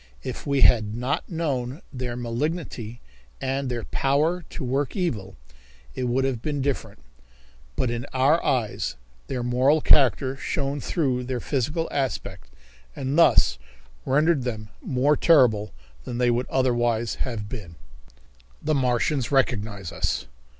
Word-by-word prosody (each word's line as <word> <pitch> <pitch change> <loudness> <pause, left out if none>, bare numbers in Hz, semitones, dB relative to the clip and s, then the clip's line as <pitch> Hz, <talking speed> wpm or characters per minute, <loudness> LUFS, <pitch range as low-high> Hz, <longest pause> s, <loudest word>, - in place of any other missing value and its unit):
If - - -6
we 140 -1 +2
had 110 -3 +5
not 125 +4 -2
known 145 -5 -2
their 125 -2 -4
malignity 120 -1 -3 0.4
and 135 0 -2
their 120 -2 -3
power 150 +6 +1
to - - -6
work 135 - -1
evil, 110 - -2 0.6
it 125 - -2
would 125 +2 +1
have 130 -4 -1
been 145 0 -2
different, 130 -6 -2 0.8
but 120 - 0
in 120 +3 -4
our 135 +6 +3
eyes 125 -8 0 0.3
their 125 -2 -3
moral 130 +5 +3
character 135 -2 +4
shone 140 +1 -2
through 130 -7 0
their 125 -1 -2
physical 150 +6 -1
aspect 135 -3 -3 0.5
and 135 +1 -2
thus 65 - +5 0.4
rendered 150 +2 +3
them 110 -4 -4
more 135 +4 +2
terrible 120 - +4 0.3
than 120 - -5
they 125 -1 +3
would 120 +2 0
otherwise 120 -3 +1
have 115 -5 -3
been. 100 -8 -8 0.8
The 155 - 0
Martians 130 0 +1
Recognize 105 -8 0
Us. - - -1
130 Hz, 135 wpm, -25 LUFS, 120-140 Hz, 0.8 s, had